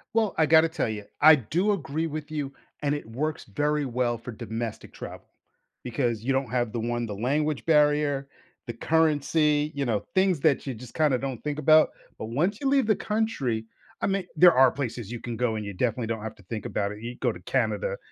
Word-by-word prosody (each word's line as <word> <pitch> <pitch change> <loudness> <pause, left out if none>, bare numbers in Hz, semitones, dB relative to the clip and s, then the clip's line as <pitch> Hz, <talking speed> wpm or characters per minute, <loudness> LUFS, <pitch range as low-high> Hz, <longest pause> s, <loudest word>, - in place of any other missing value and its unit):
Well, 220 -3 +2
I 160 - +4
gotta 160 +1 +5
tell 160 -6 -1
you, 105 -2 -4 0.2
I 155 +1 +9
do 170 - 0
agree 160 -3 -2
with 155 0 -6
you, 145 -3 -3 0.3
and 145 0 +1
it 145 - -6
works 140 +8 -3
very 150 +6 -1
well 120 -1 0
for 115 +2 -8
domestic 115 0 -6
travel, - - -9 0.6
because 120 -2 -1
you 135 - 0
don't 135 -2 0
have 120 -1 0
the 120 - -3
one 120 +1 -1
the 105 - -5
language 145 +7 -1
barrier, 150 -3 +3 0.4
the - - -4
currency, 150 +1 +2
you 140 - -1
know, 110 -5 -1
things 190 -3 +3
that 140 -1 +2
you 135 - -3
just 120 +1 -11
kinda 150 -5 +2
don't 130 -2 -5
think 150 0 -3
about. 155 0 +6 0.3
But 110 - -5
once 170 - 0
you 275 - 0
leave 270 -4 +3
the 215 - +4
country, 170 - -1 0.4
I - - +1
mean, 195 -2 0
there 175 +2 +8
are 130 -1 +6
places 120 -5 -4
you 120 - -5
can 120 0 -5
go 115 -1 0
and 105 -1 -4
you 100 - -5
definitely 115 +3 -1
don't 110 -1 -3
have 110 - -6
to 100 - -19
think 105 +3 -6
about 100 0 -2
it, 105 - -11
you 120 +1 -5
can 125 - -14
go - - -1
to - - -12
Canada, - - -1
135 Hz, 220 wpm, -26 LUFS, 115-155 Hz, 0.6 s, I